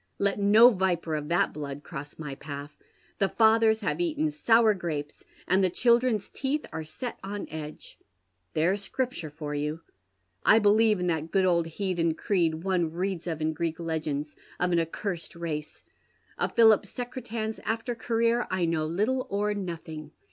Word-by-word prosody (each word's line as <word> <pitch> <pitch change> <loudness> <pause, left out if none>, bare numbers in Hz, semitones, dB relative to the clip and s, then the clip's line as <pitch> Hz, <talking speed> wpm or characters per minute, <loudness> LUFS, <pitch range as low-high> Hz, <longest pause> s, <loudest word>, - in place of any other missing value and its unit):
"Let 200 0 0
no 215 +5 +7
viper 180 -5 0
of 150 -1 -2
that 175 +4 +2
blood 145 -1 -6
cross 145 -3 -8
my 150 -3 -6
path. 145 +1 -8 0.2
' - - -34
The 195 - +2
fathers 220 0 +4
have 215 - -1
eaten 310 -2 0
sour 230 -7 +4
grapes, 155 -6 -5 0.2
and 190 +2 +3
the 185 - +3
children's 235 +1 +2
teeth 285 +3 -2
are 160 - -3
set 235 +10 -6
on 200 +1 -5
edge.' 155 -1 -8 0.6
There's 190 +5 +1
Scriptm 255 -10 -2
e - - -8
for 150 0 -6
you. 150 +2 -2 0.6
I 220 - +6
believe 215 0 +4
i'l 180 - -1
that 165 -2 -1
good 190 0 +2
old 170 -2 +2
heathen 170 -2 -1
creed 165 -5 0
one 180 -4 +1
reads 180 0 -3
of 160 -2 -3
in 160 0 +1
Greek 165 0 -2
legends, 155 -3 -3 0.2
)i 180 - +2
an 175 -1 +2
accursed 170 +2 -4
race. 155 -3 -5 0.5
Of - - -2
Pliilip 220 -3 +6
Secretan's 230 -2 -5
after 225 +2 -2
career 230 +1 +1
I 185 -2 0
know 160 -2 0
liltle 220 +10 0
or 205 +1 0
nothing. 165 -5 -6
185 Hz, 170 wpm, -28 LUFS, 160-220 Hz, 0.6 s, no